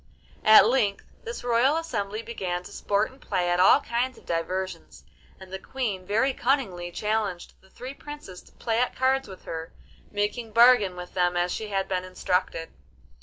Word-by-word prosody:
At 215 0 +9
length 220 -4 +1 0.2
this 465 - -6
royal 245 +5 +3
assembly 215 -10 -3
began 185 -6 -4
to - - -11
sport 205 +4 0
and 265 - -19
play 175 -1 0
at 175 - +1
all 185 - +6
kinds 245 +2 -2
of - - -17
diversions, 185 +3 -4 0.4
and 190 0 -12
the 190 - -4
Queen 205 -7 -4
very 225 +7 +2
cunningly 230 -11 0
challenged 210 -2 -2
the 190 - -23
three 255 +6 -8
Princes 290 -11 -10
to - - -21
play 225 -1 -1
at 250 - 0
cards 265 +1 +1
with 190 -1 -11
her, 160 0 -6 0.4
making 210 +2 -2
bargain 230 -5 +6
with 180 0 -9
them 180 -1 +1
as 175 0 +1
she 220 - -3
had 195 -2 -1
been 185 -1 -1
instructed. 180 -2 -2
205 Hz, 175 wpm, -26 LUFS, 185-245 Hz, 0.4 s, At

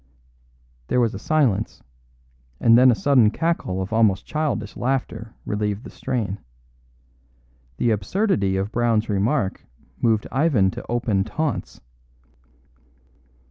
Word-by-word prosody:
There - - +1
was 115 -3 +2
a 100 - -6
silence, 125 - 0 0.8
and 115 - +5
then 130 +2 +7
a 120 - +4
sudden 115 +2 +4
cackle 110 - -1
of 95 - -6
almost 110 -4 +2
childish 145 -9 -2
laughter 120 -3 -3
relieved 105 +1 -2
the - - -10
strain. 110 -7 -3 1.4
The 120 - +1
absurdity 105 - 0
of 100 +2 -2
Brown's 115 -2 +1
remark 105 +1 0 0.4
moved 110 -2 +2
Ivan 130 -10 +2
to - - -8
open 115 -5 0
taunts. 140 +7 -3
115 Hz, 115 wpm, -23 LUFS, 100-130 Hz, 1.4 s, then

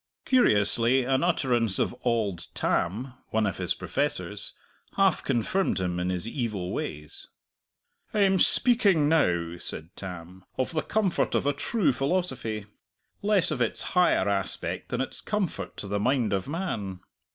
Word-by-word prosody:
Curiously, 120 - +3
an 130 +3 +1
utterance 120 - +2
of - - 0
"Auld 110 -7 0
Tam," 115 +10 -1 0.2
one 110 -1 +1
of 95 - -2
his - - 0
professors, - - -1 0.4
half 195 -1 +3
confirmed 135 - 0
him 90 -1 -1
in 90 +1 -1
his 90 +3 -1
evil 110 -8 -3
ways. 75 0 -5 0.8
"I 210 - +1
am 190 -1 +4
speaking 200 - +4
now," 85 - +1
said 80 +2 -6
Tam, 90 0 -8
"of 130 - -1
the 155 - +1
comfort 205 -4 0
of - - +1
a 145 - +2
true 155 +3 +1
philosophy, 130 - -2 0.6
less 200 -5 +5
of 135 -5 -2
its 115 - 0
higher 175 - +3
aspect 100 -1 -1
than - - -1
its - - -4
comfort 180 - -3
to 100 - -5
the 100 +1 -1
mind 125 -1 +1
of 95 +3 -1
man. 110 - -4
120 Hz, 150 wpm, -27 LUFS, -, 0.8 s, less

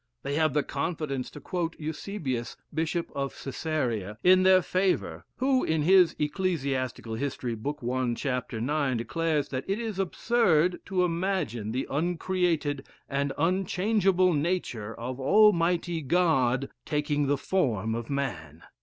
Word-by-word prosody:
They 140 - -3
have 155 -1 +2
the 150 - +3
confidence 140 -3 -3
to - - -10
quote 170 +2 -3
Eusebius, 150 - -4 0.2
Bishop 165 +2 -1
of 140 -1 -3
Cæsarea, 125 - -3
in 185 +1 +6
their 185 -1 +6
favor, 185 +2 0
who, 260 0 +2
in 160 -1 +1
his 180 +1 +5
"Ecclesiastical 140 - -1
History," 125 -1 -3
book 145 +7 -4
i., 125 -1 0
chap. 125 -2 -2
9, 130 +3 0
declares 150 +5 -1
that 130 0 -3
it 195 - +1
is 220 -4 -4
absurd 180 -3 +2
to 185 -1 +1
imagine 165 - -1
the 130 +3 -1
uncreated 165 -2 -1 0.2
and 140 0 -1
unchangeable 185 +2 +2
nature 145 - -2
of 125 +2 -5
Almighty 170 0 +3
God 135 -5 +2
taking 145 -1 0
the 145 +1 +2
form 115 - 0
of 115 0 -4
a - - -1
man. 85 - -4
150 Hz, 135 wpm, -28 LUFS, 130-180 Hz, 0.2 s, in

